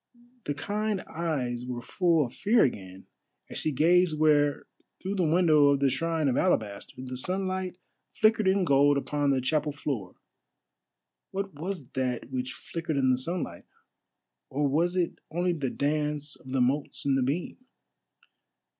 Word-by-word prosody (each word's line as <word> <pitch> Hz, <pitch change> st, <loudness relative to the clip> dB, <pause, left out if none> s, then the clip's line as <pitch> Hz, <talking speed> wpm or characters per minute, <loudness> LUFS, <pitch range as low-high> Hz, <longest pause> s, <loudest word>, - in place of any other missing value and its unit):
The 145 Hz, -, -2 dB
kind 210 Hz, +4 st, -2 dB
eyes 135 Hz, -8 st, -3 dB
were 125 Hz, -1 st, -4 dB
full 170 Hz, -1 st, +2 dB
of 120 Hz, -, -9 dB
fear 225 Hz, +3 st, +3 dB
again, 95 Hz, -6 st, -3 dB, 0.5 s
as -, -, -4 dB
she 155 Hz, -, -1 dB
gazed 165 Hz, +3 st, +3 dB
where, 145 Hz, -2 st, +3 dB, 0.3 s
through 190 Hz, +1 st, -3 dB
the 190 Hz, -3 st, 0 dB
window 160 Hz, -4 st, +5 dB
of 140 Hz, -1 st, +3 dB
the 140 Hz, -1 st, +3 dB
shrine 160 Hz, +2 st, 0 dB
of 130 Hz, -, +1 dB
alabaster, 110 Hz, -, 0 dB
the 130 Hz, 0 st, -6 dB
sunlight 185 Hz, +5 st, -2 dB, 0.3 s
flickered 215 Hz, -2 st, +3 dB
in 190 Hz, 0 st, +3 dB
gold 140 Hz, -1 st, +4 dB
upon 145 Hz, +1 st, 0 dB
the 135 Hz, -1 st, +2 dB
chapel 150 Hz, +3 st, 0 dB
floor. 135 Hz, -10 st, -4 dB, 1.1 s
What 195 Hz, -1 st, -4 dB
was 165 Hz, -1 st, -5 dB
that 125 Hz, -1 st, -2 dB
which 130 Hz, 0 st, -3 dB
flickered 165 Hz, +2 st, -4 dB
in 130 Hz, -1 st, +3 dB
the -, -, +4 dB
sunlight? 170 Hz, +5 st, -4 dB, 0.8 s
or 145 Hz, +1 st, 0 dB
was 170 Hz, +6 st, +1 dB
it 180 Hz, -2 st, -1 dB
only 175 Hz, +2 st, 0 dB
the 145 Hz, -6 st, -2 dB
dance 150 Hz, +1 st, -1 dB
of 130 Hz, -, -12 dB
the 130 Hz, -1 st, +1 dB
motes 140 Hz, +4 st, 0 dB
in 140 Hz, -, +3 dB
the 135 Hz, -, +2 dB
beam? 140 Hz, +7 st, -2 dB
150 Hz, 155 wpm, -28 LUFS, 135-175 Hz, 1.1 s, window